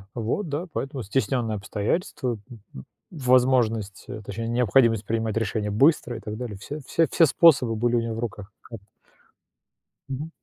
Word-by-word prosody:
Вот, 120 Hz, -, -2 dB
да. 150 Hz, +6 st, -3 dB
Поэтому 135 Hz, -2 st, -4 dB
стесненные 120 Hz, 0 st, -1 dB
обстоятельства, 115 Hz, -, -2 dB
м, 120 Hz, -3 st, -11 dB, 0.2 s
м, 65 Hz, -, -8 dB, 0.3 s
возможность, 125 Hz, -, +2 dB
э, 110 Hz, -, -7 dB
точнее 115 Hz, +4 st, -5 dB
необходимость 115 Hz, -2 st, +3 dB
принимать 115 Hz, -1 st, -1 dB
решения 105 Hz, -1 st, -1 dB
быстро 120 Hz, +1 st, +2 dB
и -, -, -8 dB
так 105 Hz, -1 st, -6 dB
далее, 120 Hz, -5 st, -6 dB
все 145 Hz, +9 st, -7 dB
все 165 Hz, -1 st, +2 dB
все 165 Hz, -, +5 dB
способы 135 Hz, -7 st, +4 dB
были 120 Hz, +2 st, +1 dB
у 120 Hz, -, +2 dB
него 115 Hz, -1 st, -3 dB
в 115 Hz, -, -5 dB
руках. 105 Hz, -3 st, -6 dB
Хаб 115 Hz, -2 st, -10 dB, 1.3 s
Мгм. 140 Hz, +4 st, -4 dB
115 Hz, 160 wpm, -25 LUFS, 110-135 Hz, 1.3 s, все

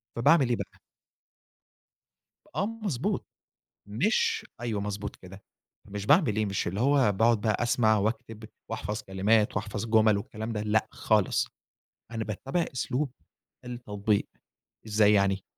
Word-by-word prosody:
فباعمل 140 Hz, +2 st, +4 dB
إيه 120 Hz, -, +2 dB
بقى؟ -, -, -8 dB, 1.8 s
آه 200 Hz, -, +1 dB
مضبوط، 210 Hz, -, -2 dB, 0.6 s
مش 245 Hz, -, +1 dB
أيوه 110 Hz, -4 st, -2 dB
مضبوط 100 Hz, 0 st, -4 dB
كده، 95 Hz, +2 st, -13 dB, 0.5 s
مش 105 Hz, 0 st, -5 dB
باعمل 145 Hz, -, +4 dB
إيه 110 Hz, -1 st, +1 dB
مش 100 Hz, -1 st, -2 dB
اللي 95 Hz, +5 st, -2 dB
هو 135 Hz, -5 st, +4 dB
باقعد 115 Hz, +2 st, +3 dB
بقى 110 Hz, +1 st, 0 dB
أسمع 110 Hz, -3 st, +3 dB
وأكتب 110 Hz, +1 st, -3 dB, 0.3 s
وأحفظ 105 Hz, +3 st, -3 dB
كلمات 105 Hz, +3 st, +2 dB
وأحفظ 105 Hz, +1 st, -3 dB
جمل 110 Hz, -2 st, +4 dB
والكلام 110 Hz, +3 st, -5 dB
ده 105 Hz, -, -2 dB
لأ، 110 Hz, +1 st, +1 dB
خالص، 105 Hz, -4 st, +1 dB, 0.7 s
أنا 115 Hz, -1 st, -2 dB
باتَّبع 135 Hz, -, -2 dB
أسلوب 130 Hz, +2 st, -1 dB, 0.5 s
التطبيق. 110 Hz, -4 st, -1 dB, 0.6 s
إزاي 105 Hz, 0 st, +4 dB
يعني؟ 100 Hz, -1 st, +2 dB
110 Hz, 125 wpm, -28 LUFS, 105-125 Hz, 1.8 s, فباعمل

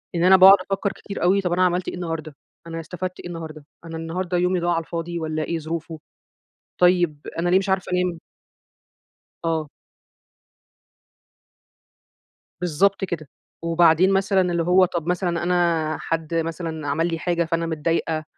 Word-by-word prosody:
إن 170 Hz, -, +1 dB
أنا 190 Hz, +1 st, +7 dB
باقعد 190 Hz, +1 st, +9 dB
أفكر 195 Hz, +1 st, 0 dB
كتير 200 Hz, -, -7 dB
أوي، 190 Hz, +3 st, +3 dB
طَب 180 Hz, -2 st, -2 dB
أنا 185 Hz, +1 st, +3 dB
عملْت 180 Hz, 0 st, 0 dB
إيه -, -, -3 dB
النهارده، 165 Hz, -4 st, -5 dB, 0.3 s
أنا 165 Hz, 0 st, -5 dB
استفدت 180 Hz, +2 st, -6 dB
إيه -, -, -7 dB
النهارده، 160 Hz, -3 st, -8 dB, 0.2 s
أنا 165 Hz, 0 st, -6 dB
النهارده 175 Hz, +2 st, -3 dB
يومي 180 Hz, +1 st, +1 dB
ضاع 175 Hz, 0 st, 0 dB
على 165 Hz, -, +1 dB
الفاضي 170 Hz, +1 st, -4 dB
والّا 155 Hz, -1 st, -2 dB
إيه 165 Hz, +1 st, -2 dB
ظروفه، 160 Hz, 0 st, -5 dB, 0.8 s
طيب 175 Hz, -5 st, +3 dB
أنا 175 Hz, +1 st, +1 dB
ليه 180 Hz, -, +5 dB
مش 195 Hz, +1 st, -1 dB
عارفة 190 Hz, -1 st, 0 dB
انام؟ 180 Hz, -2 st, 0 dB, 1.3 s
آه. 160 Hz, -3 st, -1 dB, 2.9 s
بالضبط 180 Hz, +4 st, +1 dB
كده، 165 Hz, -5 st, -5 dB, 0.4 s
وبعدين 170 Hz, +2 st, +4 dB
مثلًا 195 Hz, 0 st, +2 dB
اللي 170 Hz, -1 st, 0 dB
هو 180 Hz, +2 st, +5 dB
طَب 170 Hz, -2 st, -4 dB
مثلًا 175 Hz, -1 st, -1 dB
أنا 170 Hz, -3 st, +1 dB
حد 165 Hz, 0 st, -3 dB
مثلًا 165 Hz, -2 st, -3 dB
عمل 155 Hz, +4 st, +1 dB
لي 165 Hz, -1 st, -3 dB
حاجة 170 Hz, -1 st, 0 dB
فأنا 165 Hz, 0 st, -1 dB
متضايقة، 160 Hz, 0 st, -1 dB
170 Hz, 155 wpm, -23 LUFS, 165-180 Hz, 2.9 s, باقعد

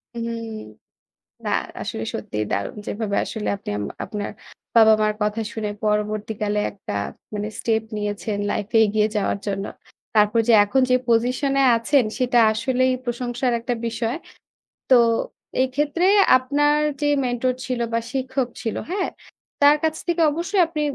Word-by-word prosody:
উহুম, 230 Hz, -1 st, -4 dB, 0.9 s
না -, -, -1 dB, 0.3 s
আসলে 110 Hz, -, -4 dB
সত্যিই 105 Hz, 0 st, -3 dB
দারুণ। 100 Hz, -, -2 dB
যেভাবে 205 Hz, -1 st, -2 dB
আসলে 220 Hz, -2 st, -4 dB
আপনি 195 Hz, -, -7 dB
আম 105 Hz, -, -3 dB, 0.2 s
আপনার 205 Hz, -1 st, -4 dB, 0.5 s
বাবা-মার 215 Hz, -1 st, +5 dB
কথা 210 Hz, +2 st, 0 dB
শুনে 215 Hz, -2 st, -3 dB
পরবর্তীকালে 210 Hz, 0 st, -1 dB
মানে 210 Hz, -, 0 dB
একটা 195 Hz, -, -7 dB, 0.6 s
স্টেপ 220 Hz, -1 st, +1 dB
নিয়েছেন 210 Hz, 0 st, -3 dB
লাইফে 210 Hz, +3 st, -2 dB
এগিয়ে 210 Hz, +1 st, +1 dB
যাওয়ার 200 Hz, 0 st, 0 dB
জন্য, 195 Hz, -1 st, -2 dB, 0.5 s
তারপর 210 Hz, +1 st, +4 dB
যে -, -, +6 dB
এখন 245 Hz, +6 st, +1 dB
যে 255 Hz, -, +6 dB
পজিশনে 255 Hz, +4 st, +2 dB
আছেন 250 Hz, +3 st, +2 dB
সেটা 245 Hz, -2 st, +2 dB
আসলেই 255 Hz, +3 st, +1 dB
প্রশংসার 245 Hz, +1 st, -1 dB
একটা 245 Hz, +1 st, -2 dB
বিষয়। 230 Hz, +2 st, -2 dB, 0.7 s
তো, 260 Hz, -, +8 dB, 0.7 s
এক্ষেত্রে 290 Hz, +6 st, 0 dB, 0.3 s
আপনার 290 Hz, +3 st, +2 dB, 0.2 s
যে 295 Hz, -, +2 dB, 0.2 s
মেন্টর 245 Hz, +1 st, 0 dB
ছিলো 250 Hz, -2 st, -1 dB
বা 230 Hz, -, +2 dB
শিক্ষক 265 Hz, -1 st, -1 dB
ছিলো, 225 Hz, -3 st, -2 dB
হ্যাঁ? 380 Hz, 0 st, -1 dB, 0.5 s
তার 290 Hz, +1 st, +7 dB
কাছ 315 Hz, -1 st, +1 dB
থেকে 345 Hz, -1 st, +1 dB
অবশ্যই 350 Hz, +5 st, 0 dB
আপনি 315 Hz, -2 st, -3 dB
230 Hz, 140 wpm, -22 LUFS, 210-260 Hz, 0.9 s, তো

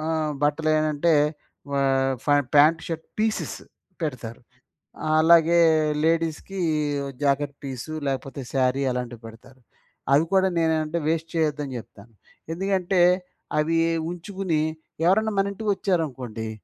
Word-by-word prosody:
ఆ! -, -, -4 dB, 0.4 s
బట్టలేటంటే 155 Hz, +1 st, +2 dB, 0.6 s
ఆహ్, 135 Hz, -1 st, +2 dB
ఫ -, -, -19 dB, 0.3 s
పాంట్ 155 Hz, +3 st, +5 dB
షర్ట్ 165 Hz, -1 st, -5 dB
పీసెస్ 220 Hz, 0 st, -1 dB, 0.5 s
పెడతారు. 125 Hz, -6 st, -5 dB, 0.8 s
అలాగే 170 Hz, +1 st, +5 dB, 0.5 s
లేడీస్‌కి 165 Hz, +3 st, -1 dB, 0.6 s
జాకెట్ 145 Hz, 0 st, +1 dB
పీసు 135 Hz, +3 st, -6 dB
లేకపోతే 135 Hz, 0 st, -3 dB
సారీ 130 Hz, +1 st, +1 dB
అలాంటివి 125 Hz, -2 st, -5 dB
పెడతారు. 125 Hz, +3 st, -15 dB, 0.5 s
అవి 145 Hz, +4 st, +4 dB
కూడా 190 Hz, 0 st, +4 dB
నేనేమంటే 160 Hz, 0 st, 0 dB
వేస్ట్ 165 Hz, 0 st, -1 dB
చేయొద్దని 150 Hz, -4 st, -1 dB
జెప్తాను. 110 Hz, 0 st, -13 dB, 0.4 s
ఎందుకంటే 190 Hz, 0 st, 0 dB, 0.6 s
అవి 165 Hz, +2 st, +1 dB, 0.3 s
ఉంచుకుని 180 Hz, -2 st, -2 dB, 0.5 s
ఎవరైనా 220 Hz, +3 st, +3 dB
మన 200 Hz, 0 st, 0 dB
ఇంటికొచ్చారనుకోండి. 160 Hz, -, -2 dB
155 Hz, 100 wpm, -24 LUFS, 135-170 Hz, 0.8 s, పాంట్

